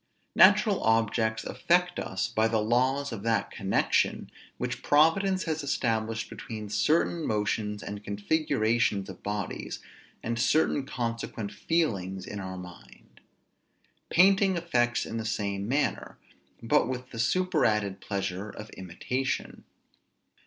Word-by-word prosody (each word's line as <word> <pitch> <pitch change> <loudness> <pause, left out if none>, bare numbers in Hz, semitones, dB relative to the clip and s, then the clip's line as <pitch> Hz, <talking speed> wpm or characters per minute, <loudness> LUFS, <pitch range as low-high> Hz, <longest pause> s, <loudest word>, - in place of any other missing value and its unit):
Natural 205 0 +5
objects 115 0 +1
affect 180 +1 +1
us 95 +4 -2
by 110 -1 +1
the 115 0 +1
laws 130 +6 +1
of 110 - -5
that 110 -2 0
connection 95 -2 0 0.3
which - - -3
Providence 185 +6 +3
has 160 -2 -2
established 115 -5 -1
between 110 -5 -7
certain 160 +7 +1
motions 105 -2 -1
and 105 0 -6
configurations 110 -3 0
of 95 - -10
bodies, 105 -2 -4 0.5
and 115 0 -2
certain 140 +1 +2
consequent 115 -4 -4
feelings 95 - -1
in 105 - -6
our 95 -1 -6
mind. 90 -1 -13 0.9
Painting 195 +1 +4
affects 120 -8 +1
in 115 - -5
the 110 - -3
same 100 -2 -2
manner, 140 +5 -1 0.5
but 115 - +3
with 125 0 -5
the 115 - -7
superadded 115 - +1
pleasure 100 0 -3
of 105 +1 -10
imitation. 125 +9 -4
115 Hz, 120 wpm, -28 LUFS, 105-145 Hz, 0.9 s, Natural